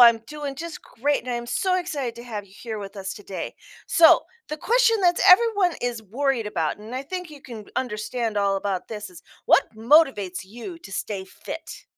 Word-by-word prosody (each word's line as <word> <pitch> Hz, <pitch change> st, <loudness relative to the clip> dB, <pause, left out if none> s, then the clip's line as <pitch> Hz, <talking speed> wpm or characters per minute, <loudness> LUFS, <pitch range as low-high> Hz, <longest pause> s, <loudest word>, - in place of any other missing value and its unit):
I'm 235 Hz, -1 st, +9 dB
doing 290 Hz, 0 st, -5 dB
just 335 Hz, +1 st, -6 dB
great, 285 Hz, +4 st, 0 dB
and 255 Hz, -, -5 dB
I -, -, 0 dB
am 240 Hz, 0 st, -4 dB
so 370 Hz, +9 st, +1 dB
excited 285 Hz, -10 st, -3 dB
to 235 Hz, -, -8 dB
have 215 Hz, -4 st, -5 dB
you 190 Hz, -, -21 dB
here 220 Hz, 0 st, -6 dB
with 200 Hz, 0 st, -8 dB
us 190 Hz, -1 st, -4 dB
today. 195 Hz, -2 st, -6 dB, 0.3 s
So 330 Hz, -1 st, +7 dB, 0.3 s
the 305 Hz, -, -3 dB
question 470 Hz, +6 st, +3 dB
that's 350 Hz, -2 st, +3 dB
everyone 405 Hz, -3 st, +5 dB
is 240 Hz, -2 st, -2 dB
worried 240 Hz, +2 st, -1 dB
about, 165 Hz, -6 st, -1 dB
and 220 Hz, +4 st, -9 dB
I 260 Hz, -, -2 dB
think 360 Hz, +3 st, -5 dB
you 290 Hz, -, -12 dB
can 225 Hz, -6 st, -9 dB
understand 225 Hz, -1 st, -2 dB
all 200 Hz, -1 st, +2 dB
about 195 Hz, -2 st, -2 dB
this 210 Hz, -2 st, -6 dB
is, 175 Hz, -1 st, -13 dB, 0.2 s
what -, -, +4 dB
motivates 220 Hz, -, +3 dB
you 240 Hz, -, -9 dB
to 195 Hz, -, -12 dB
stay 195 Hz, 0 st, -3 dB
fit? 190 Hz, -, -9 dB
240 Hz, 200 wpm, -24 LUFS, 210-300 Hz, 0.3 s, I'm